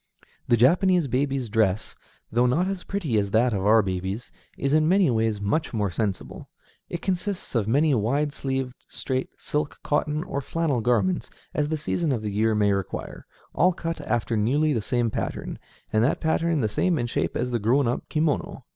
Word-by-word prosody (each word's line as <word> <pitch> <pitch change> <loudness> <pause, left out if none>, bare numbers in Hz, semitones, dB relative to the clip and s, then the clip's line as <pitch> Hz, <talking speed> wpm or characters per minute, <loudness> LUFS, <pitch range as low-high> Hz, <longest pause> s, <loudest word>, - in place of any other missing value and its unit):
The 120 - +4
Japanese 175 - +4
baby's 135 0 -1
dress, 110 -2 +1 0.4
though 120 +2 +3
not 165 +9 +2
as 195 -2 -3
pretty 160 - -1
as 100 -1 -1
that 115 +4 +3
of 95 -2 -1
our 110 0 +6
babies, 95 +4 -4 0.3
is 140 +1 0
in 155 +1 +4
many 185 -6 +4
ways 110 -2 +1
much 110 +8 -1
more 105 -3 0
sensible. 100 0 -4 0.4
It 175 - -5
consists 190 +1 -2
of 115 -5 +1
as 110 - -1
many 145 +3 +3
wide 140 +6 +1
sleeved, 135 -3 -2 0.2
straight, 130 -1 -3
silk, 150 0 -3
cotton, 150 +1 0
or 140 - -3
flannel 150 -4 -1
garments 110 -5 +1 0.2
as 150 0 0
the 155 - 0
season 155 +1 -1
of 115 -5 -1
the 105 - -2
year 110 +2 +2
may 105 -1 +3
require, 100 -1 -5 0.3
all 180 +2 +3
cut 165 -2 -4
after 120 -4 -1
nearly 145 +9 +2
the 115 - 0
same 120 +1 0
pattern, - - -4 0.3
and 110 +1 +4
that 130 - +1
pattern 160 -1 +1
the 110 - +2
same 170 - +1
in 120 - 0
shape 120 - -1
as 125 - -1
the 120 - 0
grown 120 +5 +2
up 120 - -2
kimono. 155 -4 -1
125 Hz, 190 wpm, -25 LUFS, 110-155 Hz, 0.4 s, our